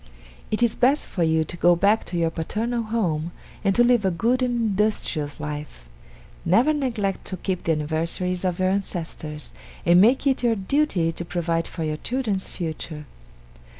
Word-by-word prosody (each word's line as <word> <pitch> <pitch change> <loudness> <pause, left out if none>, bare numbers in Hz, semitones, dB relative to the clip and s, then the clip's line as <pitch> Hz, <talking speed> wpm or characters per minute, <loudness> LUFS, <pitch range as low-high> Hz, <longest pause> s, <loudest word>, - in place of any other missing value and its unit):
It 215 +3 0
is 235 - +3
best 270 +5 +3
for 180 - -3
you 160 -1 +3
to 160 - -7
go 175 0 +4
back 205 +5 +3
to 175 - -4
your 165 -1 +1
paternal 225 +9 -2
home, 175 -8 -1 0.3
and 195 -2 +2
to 240 - +5
live 240 -3 +4
a 190 - +3
good 230 +9 +1
and 245 -1 +1
industrious 190 -8 -1
life. 150 - -6 0.6
Never 230 - +4
neglect 230 -9 -1
to 185 - -5
keep 185 0 -2
the 165 - +3
anniversaries 165 +4 -2
of 180 -2 0
your 185 0 +2
ancestors, 165 -5 -4 0.3
and 175 +1 +6
make 245 +7 +4
it 270 -2 +2
your 235 -2 +2
duty 195 - +1
to 170 - -6
provide 170 -1 -1
for 165 - -5
your 155 -1 -2
children's 220 -3 -2
future. 155 -3 -5
185 Hz, 175 wpm, -24 LUFS, 165-230 Hz, 0.6 s, and